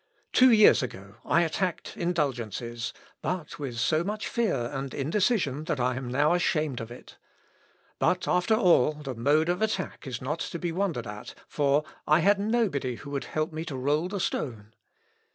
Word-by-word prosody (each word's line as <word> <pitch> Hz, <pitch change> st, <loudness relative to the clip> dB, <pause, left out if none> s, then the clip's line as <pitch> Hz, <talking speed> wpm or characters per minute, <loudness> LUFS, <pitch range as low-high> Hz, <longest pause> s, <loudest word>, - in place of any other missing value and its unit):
Two 255 Hz, 0 st, +7 dB
years 215 Hz, -2 st, +7 dB
ago 100 Hz, -4 st, -7 dB
I 170 Hz, -, +3 dB
attacked 170 Hz, +2 st, -2 dB
indulgences, 120 Hz, -, -2 dB, 0.3 s
but 170 Hz, -3 st, -4 dB
with 130 Hz, -5 st, -5 dB
so 155 Hz, +6 st, +2 dB
much 210 Hz, +3 st, -3 dB
fear 140 Hz, -, 0 dB
and 135 Hz, -1 st, -4 dB
indecision, 155 Hz, -, 0 dB
that 150 Hz, -, -1 dB
I 125 Hz, 0 st, +1 dB
am 130 Hz, -1 st, -5 dB
now 145 Hz, +6 st, +3 dB
ashamed 155 Hz, -7 st, 0 dB
of 115 Hz, -, -7 dB
it. 120 Hz, -, -13 dB, 0.8 s
But, -, -, +1 dB
after 180 Hz, +5 st, +3 dB
all, 170 Hz, -, +4 dB
the 150 Hz, -3 st, -6 dB
mode 145 Hz, +7 st, +2 dB
of 180 Hz, +2 st, 0 dB
attack 195 Hz, -8 st, -2 dB
is 125 Hz, -2 st, -4 dB
not 150 Hz, +6 st, -3 dB
to 170 Hz, -, -4 dB
be 175 Hz, 0 st, -2 dB
wondered 170 Hz, -9 st, -1 dB
at, 105 Hz, 0 st, -8 dB
for 145 Hz, 0 st, +2 dB, 0.2 s
I 155 Hz, -, +5 dB
had 200 Hz, +1 st, +4 dB
nobody 200 Hz, -, 0 dB
who 140 Hz, +4 st, -10 dB
would 140 Hz, -1 st, -3 dB
help 155 Hz, +1 st, -2 dB
me 160 Hz, +1 st, -3 dB
to 140 Hz, -5 st, -5 dB
roll 145 Hz, +6 st, +1 dB
the 200 Hz, +1 st, -4 dB
stone." 110 Hz, -, -3 dB
150 Hz, 175 wpm, -27 LUFS, 130-180 Hz, 0.8 s, Two